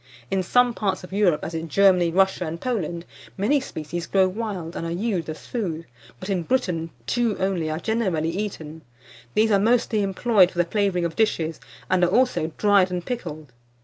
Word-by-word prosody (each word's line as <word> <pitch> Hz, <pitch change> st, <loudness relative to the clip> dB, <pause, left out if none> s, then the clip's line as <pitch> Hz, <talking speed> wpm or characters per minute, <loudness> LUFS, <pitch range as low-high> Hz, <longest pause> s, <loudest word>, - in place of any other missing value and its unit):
In 190 Hz, -, +1 dB
some 245 Hz, +6 st, +3 dB
parts 195 Hz, -5 st, -2 dB
of 180 Hz, -, -10 dB
Europe, 195 Hz, -6 st, +2 dB
as 165 Hz, -, -5 dB
in 165 Hz, 0 st, -4 dB
Germany, 185 Hz, -1 st, +4 dB
Russia, 190 Hz, 0 st, +2 dB
and 165 Hz, +2 st, -5 dB
Poland, 175 Hz, -8 st, -3 dB, 0.3 s
many 235 Hz, +10 st, +2 dB
species 170 Hz, -, -6 dB
grow 190 Hz, -1 st, +3 dB
wild, 185 Hz, -4 st, -5 dB
and -, -, -4 dB
are -, -, -3 dB
used 180 Hz, -3 st, -2 dB
as 155 Hz, -, -7 dB
food; 170 Hz, -9 st, -3 dB, 0.3 s
but 185 Hz, -, -7 dB
in 190 Hz, -3 st, 0 dB
Britain, 170 Hz, -6 st, -1 dB, 0.2 s
two 235 Hz, -, 0 dB
only 185 Hz, -4 st, -1 dB
are 155 Hz, -, -2 dB
generally 185 Hz, -8 st, 0 dB
eaten. 165 Hz, -5 st, -5 dB, 0.5 s
These 220 Hz, +1 st, +3 dB
are 200 Hz, -, +4 dB
mostly 225 Hz, 0 st, +2 dB
employed 195 Hz, -1 st, +3 dB
for 180 Hz, -, -14 dB
the 175 Hz, -, +3 dB
flavouring 190 Hz, -2 st, 0 dB
of 165 Hz, -1 st, -3 dB
dishes, 165 Hz, -8 st, 0 dB, 0.3 s
and 185 Hz, -1 st, +2 dB
are 175 Hz, -, +4 dB
also 180 Hz, -8 st, +2 dB
dried 200 Hz, -3 st, +4 dB
and 180 Hz, -1 st, -4 dB
pickled. 155 Hz, -, -5 dB
185 Hz, 185 wpm, -24 LUFS, 165-210 Hz, 0.5 s, Germany